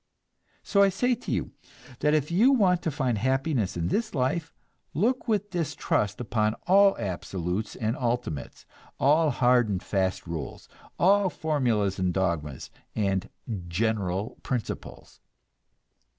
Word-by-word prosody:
So 200 - +3
I 200 - +6
say 245 +7 +1
to 240 - -5
you - - -1 0.5
that 150 +1 +3
if 150 +1 0
you 220 +10 +5
want 190 -9 +3
to - - -1
find 130 -6 -1
happiness 130 - 0
in 85 0 -1
this 220 -5 -1
life, 140 +5 0 0.4
look 245 - +1
with 205 -2 0
distrust 145 - -1
upon 110 -2 0
all 195 +1 +5
absolutes 95 0 -3
and 110 0 -1
ultimates, 120 - -3 0.3
all 155 +3 +4
hard 125 -3 +3
and 95 -2 -2
fast 95 -2 -1
rules, 85 -2 -6 0.3
all 195 +1 +4
formulas 120 - 0
and 90 -1 +1
dogmas 85 -7 -2 0.2
and 95 -3 0 0.4
"general 100 +1 -1
principles." 125 -4 -5
125 Hz, 130 wpm, -27 LUFS, -, 0.5 s, I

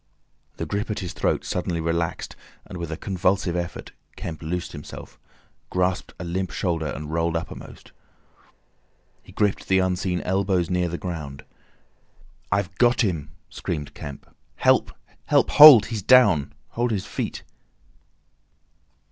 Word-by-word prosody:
The - - -3
grip 105 +3 -3
at 105 - -2
his 90 -5 -5
throat - - -1
suddenly 90 -2 -2
relaxed, 85 0 -2 0.3
and 90 - -8
with 85 -1 -5
a 80 - -4
convulsive 95 -2 0
effort, 85 -1 -5 0.2
Kemp 80 -2 -7
loosed 85 +2 -4
himself, 75 - -10 0.5
grasped 90 +1 -1
a - - -6
limp 90 +2 -2
shoulder, 85 -4 -2
and 75 +1 -6
rolled 85 0 0
uppermost. 80 - -9 1.3
He - - -16
gripped 105 -2 0
the 95 - +3
unseen 95 -1 0
elbows 95 -2 0
near 90 -1 +1
the 85 - -4
ground. 75 -7 -6 1.1
"I've 100 -2 0
got 120 0 +4
him!" 85 - -1 0.2
screamed 75 -4 -5
Kemp. 70 -1 -9 0.3
"Help! - - +3 0.4
Help—hold! 145 -8 +9
He's 115 -3 -4
down! 85 - +5 0.2
Hold 120 +1 -1
his 105 -4 -2
feet!" - - -4
90 Hz, 130 wpm, -24 LUFS, 85-95 Hz, 1.3 s, Help—hold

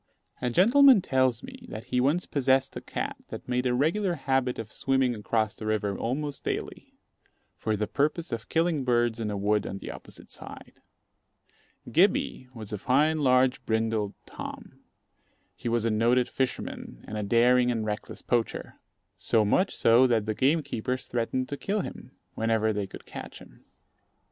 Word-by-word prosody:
A 125 - 0
gentleman 245 - +6
tells 130 -3 +1
me, - - -11
that 110 - -6
he 125 - +3
once 150 +7 +1
possessed 135 -1 +1
a - - -5
cat - - -4
that - - -8
made 125 0 0
a 125 - +1
regular 175 +7 +1
habit 135 -3 0
of 110 -1 -6
swimming 135 -1 +1
across 110 0 -1
the 110 - -7
river 105 -2 0
almost 140 +6 -3
daily, - - -5 0.6
for 110 -1 -2
the 105 - 0
purpose 150 +7 -1
of 115 0 -5
killing 165 -3 +1
birds 120 -2 +1
in 110 -2 -2
a 105 - -3
wood 105 +1 +1
on 95 - -5
the - - -7
opposite - - -13
side. - - -11 1.1
Gibbey 130 - +2
was 110 -2 -7
a 105 - -3
fine, 150 +8 +2
large, 130 -2 +3
brindled 110 -2 0
Tom. - - -9 0.8
He 120 - -4
was 115 -1 +1
a 115 - +2
noted 120 +3 +3
fisherman 125 - -4
and 105 - -6
a 105 - -2
daring 120 +4 +4
and 115 -3 -1
reckless 105 0 -5
poacher, 120 -2 -2 0.4
so 110 -2 +2
much 185 - +2
so 120 +3 +5
that 115 -4 +1
the 110 - -1
gamekeepers 130 -2 0
threatened 125 +2 -2
to 145 - -4
kill 205 +5 -1
him, - - -8 0.2
whenever 110 -1 +1
they 100 -1 -2
could - - -11
catch - - -9
him. - - -16
125 Hz, 170 wpm, -27 LUFS, 110-135 Hz, 1.1 s, gentleman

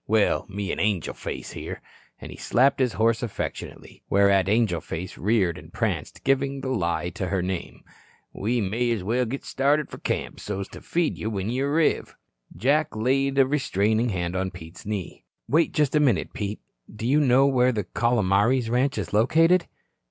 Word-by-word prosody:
Well, 110 -1 +2
me 100 0 -3
an' - - -3
Angel 100 -5 0
Face - - -6
here," - - -6 0.4
and - - -9
he - - -9
slapped 135 +4 +2
his 125 -3 +2
horse 115 +1 +2
affectionately, 115 -4 -6
whereat 100 -1 +4
Angel 105 -6 +2
Face 90 +3 -6
reared 95 -4 +1
and - - -14
pranced, - - -3
giving 135 0 +1
the 130 - -3
lie 85 -7 -1
to 100 -4 -4
her 95 -1 -1
name, 90 -1 -5 0.5
"we 115 +4 -1
may 115 +5 0
as 115 -5 -1
well 120 +6 +1
git 135 +4 -5
started 145 +2 +1
fur - - -8
camp - - -3
so's 100 -1 -4
to - - -11
feed 170 -1 -1
you 110 - -2
when 100 0 -2
you 130 +3 0
arriv." 155 +2 +1 0.4
Jack 145 - +1
laid 135 +5 +1
a 135 - +6
restraining 115 -5 +1
hand 90 -3 -2
on 95 0 -1
Pete's 90 0 -11
knee. 105 -4 -5 0.2
"Wait 160 +3 +3
just 150 -2 +1
a - - +5
minute, 120 - +1
Pete. 105 0 -4 0.3
Do 105 +2 -7
you 140 +5 +3
know 135 -1 +5
where 130 -2 +3
the 105 -4 -2
Calomares 115 +2 +1
ranch 130 +3 +1
is - - -4
located?" 165 - +4
115 Hz, 180 wpm, -25 LUFS, 100-135 Hz, 0.5 s, a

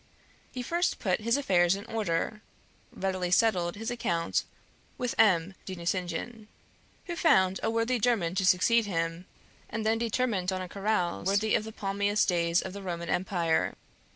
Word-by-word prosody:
He 250 - -5
first 345 +7 0
put 190 0 0
his 230 +4 +2
affairs 180 -9 +3
in 200 +2 -8
order, 210 -1 -2 0.5
readily 185 -2 -2
settled 180 -3 +2
his 225 +3 -4
account 170 -8 -1 0.5
with 250 -1 -2
M. 185 -3 +4
de 190 - -6
Nucingen, 180 +5 -3 0.6
who 345 - -4
found 190 - +3
a - - 0
worthy 230 +2 0
German 210 -8 +1
to 190 +1 0
succeed 220 +5 +4
him, 165 0 -2 0.4
and 220 0 -4
then 225 +1 +2
determined 225 -5 0
on 185 - -2
a - - -6
carouse 195 -2 -1
worthy 205 +2 +2
of 215 - +2
the 220 - -7
palmiest 200 0 0
days 170 -1 +2
of 190 - -6
the 200 - -7
Roman 170 -3 -5
Empire. 175 -3 0
195 Hz, 160 wpm, -29 LUFS, 180-225 Hz, 0.6 s, M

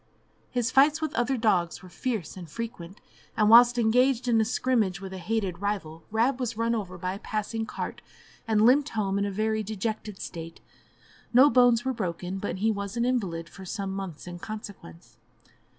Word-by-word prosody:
His 245 0 -1
fights 290 +4 +5
with 315 -1 -3
other 255 +2 0
dogs 190 -7 +1
were - - -10
fierce 215 -1 -4
and 175 -3 -9
frequent, 200 -4 -7 0.4
and 215 0 +4
whilst 240 +1 +8
engaged 250 +2 +3
in 230 -2 +4
a - - +2
scrimmage 220 -6 0
with 190 -1 -8
a 190 - -6
hated 190 -2 -2
rival, 190 -6 -3
Rab 240 +5 +1
was 240 -3 -3
run 230 +1 +1
over 190 -5 -4
by 185 +1 -3
a 195 - -7
passing 220 +1 -3
cart, - - -5 0.5
and 215 -1 +3
limped 280 +5 +5
home 200 -2 0
in 200 - +1
a 200 - -2
very 220 +2 0
dejected 215 -1 -4
state; 165 -1 -7 0.8
no 275 +4 +8
bones 245 -1 +4
were 260 - 0
broken, 185 -3 -4
but 205 - -3
he 220 +4 +2
was 200 +1 -4
an 235 - +1
invalid 190 -10 -1
for 190 - -12
some 195 +1 -4
months 190 -5 -6
in 175 -1 -8
consequence. 205 - -9
215 Hz, 185 wpm, -27 LUFS, 190-235 Hz, 0.8 s, whilst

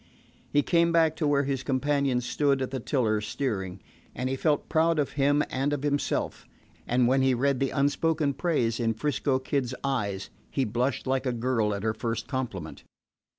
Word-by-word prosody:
He 145 0 +3
came 170 -1 +3
back 165 -2 +3
to 155 - 0
where 140 -1 +3
his 135 -1 -1
companion 135 -1 +1
stood 135 +2 +1
at 130 - -4
the 135 - -2
tiller 110 -4 0
steering, 100 -5 -3 0.3
and 125 +1 -2
he - - 0
felt 145 +1 0
proud 165 +1 +2
of 145 -2 0
him 145 +1 +2
and 135 +2 -1
of 145 -1 -3
himself; 145 -1 -1 0.4
and 120 0 +3
when 135 +2 +3
he 130 -1 +3
read 135 +1 +1
the 135 - +1
unspoken 145 +1 +1
praise 125 -8 0
in 115 -1 +1
'Frisco 140 +1 0
Kid's 130 -1 -2
eyes 100 -8 -2 0.2
he 135 - 0
blushed 120 +4 -1
like 130 0 0
a - - +2
girl 115 -3 0
at 100 - -5
her 110 -1 +1
first 115 +1 -3
compliment. 120 - -4
135 Hz, 185 wpm, -27 LUFS, 120-145 Hz, 0.4 s, He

